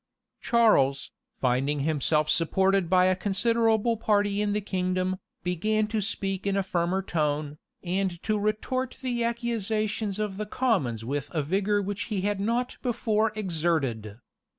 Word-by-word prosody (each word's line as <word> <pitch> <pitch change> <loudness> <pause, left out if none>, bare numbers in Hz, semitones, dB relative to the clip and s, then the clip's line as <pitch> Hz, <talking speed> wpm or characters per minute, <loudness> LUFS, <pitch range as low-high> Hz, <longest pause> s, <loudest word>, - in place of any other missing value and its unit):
Charles, 140 - +3 0.2
finding 135 +3 0
himself 155 +1 +1
supported 190 +3 +2
by 185 0 +5
a 185 0 +3
considerable 225 +3 +2
party 205 -2 +1
in 210 -1 0
the 210 - +1
kingdom, 185 -1 -1 0.3
began 215 +5 +1
to 220 -1 0
speak 195 -1 -2
in 200 0 +1
a 195 - +1
firmer 185 +1 0
tone, 150 -3 -1 0.2
and 185 -1 -1
to 215 -1 0
retort 215 +5 -1
the 240 -2 -1
accusations 220 -3 -1
of 210 -2 -3
the 210 0 -4
commons 155 - 0
with 140 +2 -3
a 155 - +1
vigor 200 +6 +1
which 200 +1 -3
he 210 -5 -2
had 205 0 -1
not 235 +5 -1
before 225 -3 +1
exerted. 155 - -1
195 Hz, 145 wpm, -27 LUFS, 170-215 Hz, 0.3 s, by